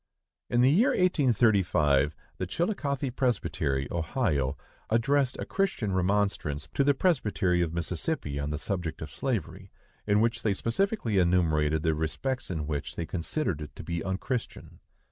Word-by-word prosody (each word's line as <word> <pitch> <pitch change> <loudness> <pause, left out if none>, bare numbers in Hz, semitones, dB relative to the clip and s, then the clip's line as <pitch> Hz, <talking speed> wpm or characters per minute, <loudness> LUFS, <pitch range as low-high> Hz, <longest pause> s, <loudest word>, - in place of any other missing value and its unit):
In 120 - +3
the 130 +2 +6
year 210 - +4
1835, 100 - +3 0.2
the 95 - -2
Chillicothe 140 - -1
Presbytery, 80 - 0
Ohio, 80 - 0 0.3
addressed 130 +4 +2
a - - -4
Christian 190 - -1
remonstrance 95 -6 0
to 140 - +2
the 140 0 +3
presbytery 105 - +1
of 85 -2 0
Mississippi 85 - -2
on 70 +1 -2
the 75 - -2
subject 85 -2 -3
of 75 - -8
slavery, 100 - -3 0.4
in 105 0 +4
which 115 +1 +1
they 105 -3 +1
specifically 115 - 0
enumerated 80 -4 +2
the 80 - +2
respects 80 - -2
in 80 -4 -2
which 75 -1 -4
they 85 - -3
considered 90 - -2
it 75 - -8
to - - -8
be 85 -1 -3
unchristian. 100 +6 -4
95 Hz, 145 wpm, -28 LUFS, 80-130 Hz, 0.4 s, the